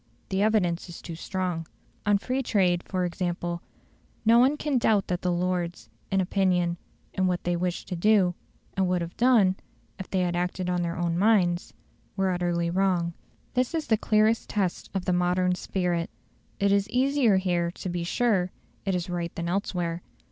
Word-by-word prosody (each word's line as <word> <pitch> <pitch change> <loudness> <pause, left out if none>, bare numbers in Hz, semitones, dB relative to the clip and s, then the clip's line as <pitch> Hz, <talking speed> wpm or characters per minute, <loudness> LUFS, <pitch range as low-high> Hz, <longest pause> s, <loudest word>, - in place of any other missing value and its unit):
The 190 0 0
evidence 190 -5 +1
is 170 - -8
too 170 - -7
strong. 175 -1 -3 0.4
On 205 -1 +5
free 255 +6 -2
trade, 185 -7 +2
for 185 -1 -2
example, 175 -1 -3 0.6
no 230 +2 +6
one 270 +4 +4
can 290 -4 0
doubt 215 -4 +3
that 180 -1 -2
the 180 - 0
Lords 175 -8 -2 0.2
in 195 - +2
opinion, 180 -2 +1 0.4
in 190 0 +1
what 180 -1 -1
they 175 0 0
wished 175 0 -2
to 180 - -2
do, 190 0 +4 0.4
and 190 -1 +2
would 180 -1 +1
have 170 - -8
done, 225 -7 +4 0.4
if 190 - -7
they 190 - +1
had 175 -1 0
acted 180 +1 -1
on 180 0 0
their 170 0 -2
own 170 0 0
minds 185 -5 +2 0.4
were 190 -1 +2
utterly 175 -1 0
wrong. 180 -2 +1 0.4
This 255 +5 0
is 320 - -1
the 225 - +3
clearest 215 +1 +2
test 190 -4 -1
of 185 -2 -1
the 180 - +1
"modern 180 +1 +2
spirit". 180 -2 -1 0.5
It 200 0 +3
is 200 0 +2
easier 255 -4 +3
here 175 -2 +1
to 175 - -7
be 175 -1 -2
sure 190 -1 +1 0.4
it 195 -2 +1
is 175 -1 -2
right 175 -1 -3
than 170 0 -3
elsewhere. 175 -3 -2
180 Hz, 180 wpm, -27 LUFS, 175-200 Hz, 0.6 s, no